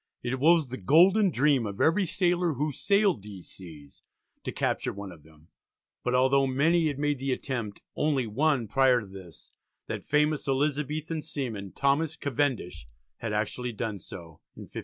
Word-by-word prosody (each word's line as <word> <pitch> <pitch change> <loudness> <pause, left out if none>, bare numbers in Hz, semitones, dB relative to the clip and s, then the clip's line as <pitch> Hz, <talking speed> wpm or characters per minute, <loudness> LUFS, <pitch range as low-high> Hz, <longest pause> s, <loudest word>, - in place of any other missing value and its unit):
It 125 +2 -2
was 160 -1 +4
the 130 - -6
golden 185 - +5
dream 140 -6 +2
of 100 -1 -7
every 180 +4 +3
sailor 175 -1 +1
who 150 +3 -1
sailed 200 - +2
these 95 -3 -11
seas 75 -6 -13 0.4
to - - -4
capture - - -1
one 100 -1 -8
of 85 -3 -14
them, 80 +1 -21 0.5
but 125 0 0
although 135 +2 +3
many 160 +5 +2
had 145 -3 -2
made 145 -1 0
the 135 0 -2
attempt, 120 -5 -4
only 145 -4 +1
one 130 +2 +1
prior 130 0 +3
to - - -9
this, 95 -4 -13 0.3
that - - -5
famous 150 0 +1
Elizabethan 150 +3 -1
seaman 110 -11 -5
Thomas 145 +3 +1
Cavendish, 125 - -2 0.3
had 115 - -4
actually 110 +3 -2
done 110 -2 -4
so, 85 -3 -12
in - - -9
1587. - - -16
130 Hz, 165 wpm, -28 LUFS, 105-150 Hz, 0.5 s, golden